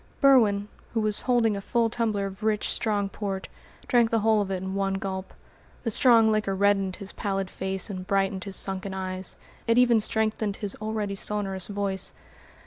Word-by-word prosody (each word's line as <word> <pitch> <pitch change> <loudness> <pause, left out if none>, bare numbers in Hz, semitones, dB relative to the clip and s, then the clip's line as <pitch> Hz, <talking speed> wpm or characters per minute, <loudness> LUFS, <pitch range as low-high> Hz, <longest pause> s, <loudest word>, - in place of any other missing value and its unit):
Berwin, 220 -8 +5 0.3
who - - +3
was 215 -1 0
holding 235 -4 +2
a 200 - -4
full 235 +3 +1
tumbler 220 -3 -1
of 195 +1 -7
rich, 215 -1 +1
strong 205 -3 0
port, 195 -1 -4 0.4
drank 240 -3 +4
the 225 -1 +1
whole 220 0 +3
of 200 - -3
it 190 - -1
in 190 +1 -5
one 195 0 0
gulp. 190 -1 -4 0.5
The 230 - +1
strong 225 -1 +5
liquor 210 -2 0
reddened 195 -1 +2
his 200 - -6
pallid 195 -2 -2
face 190 0 -1
and 185 -3 -6
brightened 195 -1 0
his 195 -1 -6
sunken 190 0 -3
eyes; 185 0 -3 0.3
it 230 +1 +3
even 245 -2 +5
strengthened 215 -1 -1
his 205 -2 -4
already 215 -2 -2
sonorous 195 -2 -2
voice. 200 -2 -2
200 Hz, 180 wpm, -26 LUFS, 195-220 Hz, 0.5 s, Berwin